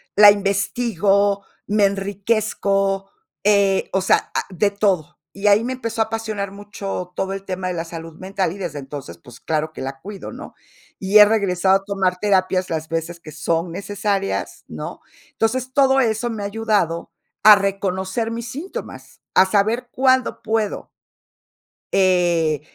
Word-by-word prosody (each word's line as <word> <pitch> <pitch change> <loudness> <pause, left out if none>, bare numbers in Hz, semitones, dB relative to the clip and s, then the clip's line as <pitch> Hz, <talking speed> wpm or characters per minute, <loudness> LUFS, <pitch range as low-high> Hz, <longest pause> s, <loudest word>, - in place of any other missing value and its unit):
la 205 0 +9
investigo, 200 0 +1 0.2
me 205 0 +3
enriquezco, 195 0 0 0.3
eh, 200 -1 +3
o 190 - +2
sea, 190 - +2
ah, - - +1
de 200 +2 +1
todo, 190 -5 0
y 200 +2 -2
ahí 205 +2 +5
me 255 +2 -2
empezó 230 -3 -3
a - - +3
apasionar 215 -3 -4
mucho 200 -3 -6
todo 190 - -2
el 195 0 -6
tema 185 -1 -3
de - - -2
la 165 0 -3
salud 165 -1 -8
mental, 190 -2 -2
y - - -9
desde 170 -7 -5
entonces, 135 - -8
pues, 120 +7 -15
claro 155 0 -2
que - - -8
la 135 0 -5
cuido, 200 0 -8
¿no? - - -10 0.5
Y 195 +2 +3
he 210 - +11
regresado 195 -3 +2
a 195 - -13
tomar 190 -2 0
terapias 185 -2 +1
las 160 -1 -3
veces 165 +1 -3
que 155 - -10
son 165 +2 -1
necesarias, 200 +1 -3
¿no? - - -7 0.3
Entonces, 255 +3 -1
todo 270 -1 +4
eso 230 0 0
me 220 -3 -4
ha - - -3
ayudado 205 -6 -1 0.3
a 210 0 +10
reconocer 195 +2 -2
mis 230 0 -5
síntomas, 320 +9 -8
a 185 - +6
saber 215 +5 +1
cuándo 260 -1 +2
puedo. 220 -1 -2 1.0
Eh, 175 -5 +2
195 Hz, 160 wpm, -21 LUFS, 180-215 Hz, 1.0 s, he